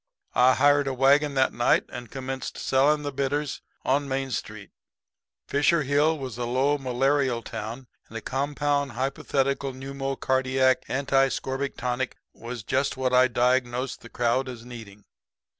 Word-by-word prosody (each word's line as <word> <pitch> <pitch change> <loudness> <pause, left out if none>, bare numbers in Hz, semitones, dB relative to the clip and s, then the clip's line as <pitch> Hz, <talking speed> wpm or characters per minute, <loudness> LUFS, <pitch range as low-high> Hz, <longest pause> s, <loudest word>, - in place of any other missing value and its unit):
"I 125 +2 +5
hired 145 0 +4
a 135 - -1
wagon 140 +2 +3
that 130 0 +2
night 120 - +3
and 120 -2 -8
commenced 130 0 -5
selling 150 +3 +2
the 145 - -3
bitters 140 +1 -2 0.2
on 140 +2 +1
Main 135 0 -2
Street. 110 -3 -5 0.8
Fisher 145 +3 +2
Hill 145 +3 +2
was 130 -4 -6
a 120 - -1
low, 135 +4 +1
malarial 130 -1 +1
town; 115 +3 -6 0.2
and 115 - -6
a - - -6
compound 140 +2 -1
hypothetical 135 0 -1
pneumocardiac 130 -1 0
anti 135 0 +2
scorbutic 135 +1 -3
tonic 125 +1 -2 0.2
was 120 -1 -7
just 135 +5 0
what 130 -1 0
I 125 0 +6
diagnosed 125 +1 0
the 115 - -12
crowd 120 +3 0
as 120 -2 -9
needing. 110 -5 -11
130 Hz, 145 wpm, -26 LUFS, 125-140 Hz, 0.8 s, I